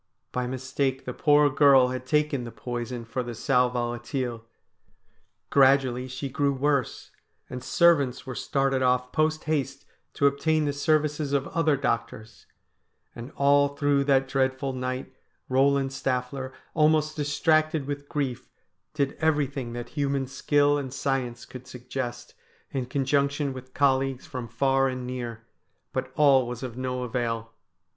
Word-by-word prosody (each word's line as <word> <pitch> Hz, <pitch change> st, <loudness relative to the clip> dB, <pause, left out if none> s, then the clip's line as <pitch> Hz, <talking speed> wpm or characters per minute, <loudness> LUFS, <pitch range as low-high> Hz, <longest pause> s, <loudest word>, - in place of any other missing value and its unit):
By 125 Hz, -1 st, -2 dB
mistake 130 Hz, +1 st, -2 dB
the 125 Hz, -, -4 dB
poor 150 Hz, +1 st, +4 dB
girl 140 Hz, -3 st, +6 dB
had 130 Hz, 0 st, -5 dB
taken 150 Hz, -2 st, +1 dB
the 120 Hz, -, -7 dB
poison 120 Hz, +1 st, -5 dB
for 115 Hz, +3 st, -3 dB
the 120 Hz, -1 st, -6 dB
sal 125 Hz, +1 st, +2 dB
volatile. 120 Hz, 0 st, -3 dB, 1.1 s
Gradually 130 Hz, -2 st, +4 dB
she 130 Hz, +2 st, -5 dB
grew 140 Hz, +1 st, 0 dB
worse, 140 Hz, -1 st, -1 dB, 0.4 s
and 125 Hz, 0 st, -6 dB
servants 145 Hz, -8 st, +3 dB
were 130 Hz, -, -5 dB
started 135 Hz, -1 st, 0 dB
off 125 Hz, 0 st, +1 dB
post 155 Hz, 0 st, +1 dB
haste 140 Hz, -3 st, -2 dB, 0.3 s
to 140 Hz, -, +1 dB
obtain 155 Hz, +2 st, +2 dB
the 145 Hz, -, 0 dB
services 150 Hz, 0 st, 0 dB
of 140 Hz, -1 st, +1 dB
other 160 Hz, -4 st, +2 dB
doctors, 110 Hz, -4 st, -3 dB, 0.7 s
and 120 Hz, +4 st, -8 dB
all 140 Hz, 0 st, +3 dB
through 145 Hz, -1 st, +2 dB
that 135 Hz, -1 st, +3 dB
dreadful 130 Hz, 0 st, 0 dB
night 130 Hz, 0 st, -4 dB, 0.4 s
Eoland 135 Hz, +1 st, +3 dB
Staffier, 130 Hz, 0 st, -3 dB, 0.2 s
almost 155 Hz, 0 st, +3 dB
distracted 155 Hz, +1 st, +1 dB
with 145 Hz, 0 st, -5 dB
grief, 135 Hz, -5 st, -3 dB, 0.5 s
did 140 Hz, -1 st, 0 dB
everything 140 Hz, -6 st, 0 dB
that 120 Hz, 0 st, -6 dB
human 140 Hz, -2 st, -1 dB
skill 145 Hz, +2 st, +2 dB
and 135 Hz, -2 st, -5 dB
science 130 Hz, -3 st, -2 dB
could 130 Hz, 0 st, -11 dB
suggest, 125 Hz, 0 st, -6 dB, 0.4 s
in 130 Hz, -2 st, -3 dB
conjunction 140 Hz, +1 st, 0 dB
with 130 Hz, 0 st, -11 dB
colleagues 135 Hz, -2 st, +1 dB
from 125 Hz, -2 st, -6 dB
far 135 Hz, +3 st, +2 dB
and 130 Hz, -1 st, -4 dB
near, 120 Hz, -3 st, -6 dB, 0.5 s
but -, -, -3 dB
all 135 Hz, -4 st, +5 dB
was 125 Hz, +1 st, -6 dB
of 125 Hz, -3 st, -5 dB
no 125 Hz, 0 st, -3 dB
avail. 115 Hz, -2 st, -3 dB
135 Hz, 140 wpm, -26 LUFS, 125-145 Hz, 1.1 s, girl